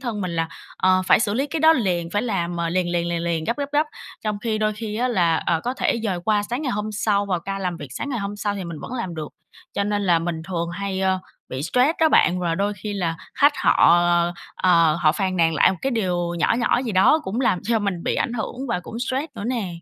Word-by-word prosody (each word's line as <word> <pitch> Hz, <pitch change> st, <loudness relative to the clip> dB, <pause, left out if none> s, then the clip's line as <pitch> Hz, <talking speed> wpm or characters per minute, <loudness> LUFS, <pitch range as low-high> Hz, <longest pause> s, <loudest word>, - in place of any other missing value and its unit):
thân 235 Hz, -5 st, -3 dB
mình 185 Hz, -2 st, -2 dB
là, 165 Hz, 0 st, 0 dB, 0.3 s
ờ, 185 Hz, 0 st, +3 dB
phải -, -, +5 dB
xử 210 Hz, -2 st, 0 dB
lý 275 Hz, +4 st, 0 dB
cái 320 Hz, 0 st, -3 dB
đó 320 Hz, 0 st, +7 dB
liền, 180 Hz, -, 0 dB
phải 205 Hz, +2 st, 0 dB
làm, 175 Hz, -7 st, -2 dB
ờ, 170 Hz, 0 st, -1 dB
liền 175 Hz, +1 st, 0 dB
liền 170 Hz, 0 st, 0 dB
liền 170 Hz, -1 st, -2 dB
liền, 165 Hz, -2 st, -1 dB
gấp 235 Hz, -, -1 dB
gấp 285 Hz, 0 st, -4 dB
gấp. 300 Hz, +2 st, +3 dB, 0.4 s
Trong 210 Hz, -1 st, -1 dB
khi 220 Hz, 0 st, -2 dB
đôi 215 Hz, 0 st, +1 dB
khi 210 Hz, 0 st, -5 dB
á 250 Hz, +2 st, +1 dB
là, 175 Hz, -8 st, +2 dB
ờ, 165 Hz, -2 st, +2 dB
có 250 Hz, +2 st, -1 dB
thể 235 Hz, -, 0 dB
dời 190 Hz, -5 st, -1 dB
qua 210 Hz, -1 st, +2 dB
sáng 245 Hz, +8 st, -3 dB
ngày 260 Hz, -, -1 dB
hôm 210 Hz, +1 st, -3 dB
sau, 205 Hz, -1 st, +1 dB
vào 180 Hz, -3 st, -1 dB
ca 195 Hz, +3 st, -4 dB
làm 180 Hz, -3 st, -2 dB
việc 145 Hz, -4 st, -8 dB
sáng 130 Hz, -, -5 dB
ngày 255 Hz, -4 st, -2 dB
hôm 200 Hz, 0 st, -4 dB
sau 205 Hz, -1 st, -2 dB
thì 195 Hz, -2 st, -5 dB
mình 170 Hz, -2 st, -6 dB
vẫn -, -, -8 dB
làm 230 Hz, -9 st, -4 dB
được. 155 Hz, -2 st, -5 dB, 0.5 s
Cho 200 Hz, -, 0 dB
nên 205 Hz, 0 st, -1 dB
là 175 Hz, -4 st, +3 dB
mình 165 Hz, -1 st, -3 dB
thường 170 Hz, -2 st, -2 dB
hay, 190 Hz, +1 st, -3 dB
ơ, 190 Hz, 0 st, +2 dB, 0.3 s
bị 130 Hz, +2 st, -4 dB
stress 250 Hz, -, +3 dB
đó 320 Hz, -, +6 dB
bạn, 180 Hz, -, +3 dB
và 170 Hz, -2 st, 0 dB
đôi 200 Hz, +3 st, 0 dB
khi 210 Hz, -, -3 dB
là 175 Hz, -5 st, -2 dB, 0.2 s
khách 285 Hz, +1 st, +5 dB
họ, -, -, +3 dB, 0.2 s
ờ, 175 Hz, 0 st, +2 dB, 0.2 s
ờ, 170 Hz, -3 st, +4 dB
ờ, -, -, -1 dB
họ 155 Hz, -1 st, +4 dB
phàn 185 Hz, 0 st, -1 dB
nàn 165 Hz, -1 st, +3 dB
lại 150 Hz, -, +5 dB
một 190 Hz, -, -3 dB
cái 270 Hz, -, 0 dB
điều 180 Hz, -7 st, -1 dB
nhỏ -, -, +2 dB
nhỏ 240 Hz, -, +2 dB
gì 235 Hz, -4 st, -3 dB
đó 190 Hz, +11 st, +5 dB
cũng 210 Hz, +6 st, -2 dB
làm 190 Hz, -8 st, +2 dB
cho 225 Hz, +1 st, +1 dB
mình 200 Hz, -5 st, -2 dB
bị -, -, 0 dB
ảnh 235 Hz, -, -1 dB
hưởng 235 Hz, 0 st, -4 dB
và 230 Hz, -6 st, -1 dB
cũng 225 Hz, +6 st, -8 dB
stress 260 Hz, +4 st, -1 dB
nữa 205 Hz, -, -6 dB
nè. 235 Hz, -5 st, -1 dB
200 Hz, 275 wpm, -23 LUFS, 175-230 Hz, 0.5 s, đó